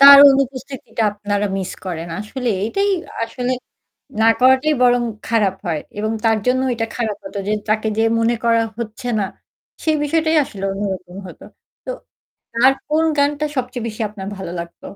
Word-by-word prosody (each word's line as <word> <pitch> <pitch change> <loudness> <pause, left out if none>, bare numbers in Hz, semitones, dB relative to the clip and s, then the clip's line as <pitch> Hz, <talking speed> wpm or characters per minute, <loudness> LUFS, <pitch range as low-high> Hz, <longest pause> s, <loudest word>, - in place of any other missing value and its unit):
তার 280 0 +12
অনুপস্থিতিটা 265 -3 -2
আপনারা 205 0 -1
মিস 190 -1 -3
করেন। 170 -2 -4
আসলে 245 +4 -4 0.2
এটাই 395 - +1 0.3
আসলে 245 +2 -2 0.7
না - - +5
করাটাই 260 +4 +5
বরং 245 0 +4 0.2
খারাপ 210 -5 +2
হয় 165 -3 0 0.2
এবং 215 +1 -1
তার 225 -1 +4
জন্য 255 +1 +3
ওইটা 230 -2 -1
খারাপ 220 -4 -2
হত 195 - -9
যে - - +1 0.2
তাকে 215 +1 +1
যে 225 - +3 0.2
মনে 230 +1 +2
করা 230 -1 +4 0.2
হচ্ছে 235 +2 -5
না - - +1 0.6
সেই 315 -1 +2
বিষয়টাই 320 +2 +2
আসলে 195 -7 -9
অন্যরকম 190 -2 -4
হত। - - -12 0.5
তো - - -6 0.6
তার 250 +3 +5 0.2
কোন 310 +2 +3
গানটা 290 +1 +2
সবচেয়ে 250 -2 -3
বেশি 220 0 -6
আপনার 195 -2 -8
ভালো 190 -3 -6
লাগত? 170 0 -8
230 Hz, 160 wpm, -20 LUFS, 205-260 Hz, 0.7 s, তার